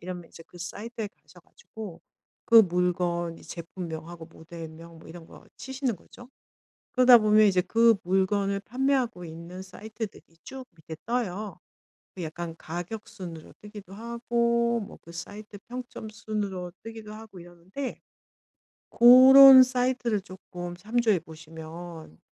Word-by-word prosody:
이러면 180 -1 -7
이제 165 - -14
그 175 - -16
사이트에 215 +6 -6 0.2
가셔 - - -19
가지고 200 -7 -11 0.4
그 230 - +4
물건 175 -3 +2
이제 - - -16
제품명하고 170 -1 -8
모델명 165 0 -11
뭐 - - -15
이런 165 0 -11
거 - - -16
치시는 265 -2 -3
거죠. 245 +6 -16 0.6
그러다 250 -1 +7
보면 215 -1 +4
이제 185 -2 +3
그 230 +4 +4
물건을 195 +2 0
판매하고 250 -5 -1
있는 170 +3 -9
사이트들이 215 +2 -8 0.2
쭉 265 -1 -9
밑에 160 0 -10
떠요. 215 -5 -3 0.6
그 185 - -7
약간 165 +1 -6
가격 175 +8 -7
순으로 170 -5 -10
뜨기도 205 -2 -11
하고 235 +1 0
뭐 200 - -9
그 170 - -14
사이트 205 +5 -9
평점 245 -2 -8
순으로 205 -4 -5
뜨기도 225 -1 -9
하고 215 -4 -12
이러는데 175 +10 -8 0.9
고런 260 +2 +9
사이트를 250 -3 0
쪼끔 175 -1 -9
참조해 220 0 +1
보시면 160 - -11
195 Hz, 295 characters per minute, -26 LUFS, 175-235 Hz, 0.9 s, 고런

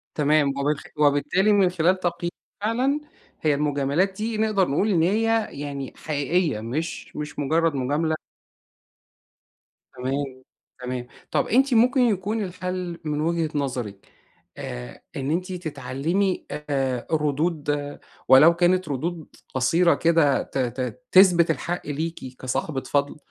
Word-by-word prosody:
تمام. 150 -1 +3
وبال 140 +2 0 0.2
وبالتالي 150 +7 +3
من 195 -3 +4
خلال 180 +2 +2
تقيي 175 -1 -2 0.3
فعلًا 255 +7 +1 0.4
هي 155 -2 +2
المجاملات 145 +5 +1
دي 220 +1 -2
نقدر 215 -4 +2
نقول 155 +10 +1
إن 175 -6 +3
هي 225 +4 +2
يعني 140 -2 -5
حقيقية، 150 -3 0
مش 145 +9 -4
مش 150 0 -6
مُجرّد 160 +2 +1
مجاملة 145 +5 0 1.8
تمام. 135 +3 -1 0.6
تمام. 125 -1 -4 0.2
طب - - +1
أنتِ 260 +2 +3
ممكن 255 +4 +4
يكون 215 -2 +1
الحل 180 -1 -4
من 150 -1 -1
وجهة 165 0 0
نظرِك. 125 -8 -3 0.5
آآ - - -7
إن 135 +1 -2
أنتِ 180 +3 -1
تتعلّمي 160 +4 -2
آآ 135 -4 -2
ردود 150 +1 0 0.6
ولو 150 +6 +8
كانت 180 0 +2
ردود 160 +4 -3 0.3
قصيرة 165 +7 +3
كده 165 -4 +3
ت - - -6
ت 125 - -3
تثبت 180 -3 +6
الحق 175 +2 -2
ليكِ 145 -3 -4
كصاحبة 135 +2 -2
فَضْل، 145 +2 -1
160 Hz, 125 wpm, -24 LUFS, 140-185 Hz, 1.8 s, ولو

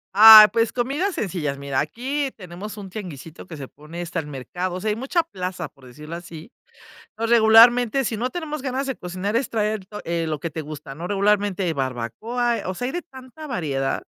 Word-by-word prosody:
Ay, 215 0 +11
pues, 230 -1 +2
comidas 285 +11 -1
sencillas. 160 -8 -3
Mira, 140 -1 -2
aquí 265 - -2
tenemos 195 +3 -9
un 195 -2 -9
tianguisito 170 -5 -9
que 165 - -9
se 135 -2 -7
pone. 155 +5 -11
Está 170 0 -4
el 150 - -6
mercado, 175 +7 -5
o 185 - -5
sea, 215 - -1
hay - - -1
mucha 270 +9 0
plaza, 185 - -5
por 130 -2 -19
decirlo 150 +6 -9
así. 170 +3 -10 0.6
Entonces, 225 +2 -4
regularmente, 235 +3 +6
si 220 -2 -2
no 250 +2 -1
tenemos 305 -2 -5
ganas 265 +1 -3
de 265 - -3
cocinar 185 +4 -4
es 260 - 0
traer 215 -3 -2
to 210 +1 -8
eh, 170 0 -2
lo 155 -1 -2
que 165 +3 -5
te 160 - -5
gusta, 150 -2 -8
¿no? 170 +5 -6
Regularmente 200 -3 +1
barbacoa, 155 - -2
o 185 - -3
sea, 245 - -5
hay 260 - -4
de 350 -1 -3
tanta 265 +1 -12
variedad, 145 - -2
200 Hz, 205 wpm, -23 LUFS, 160-240 Hz, 0.6 s, Ay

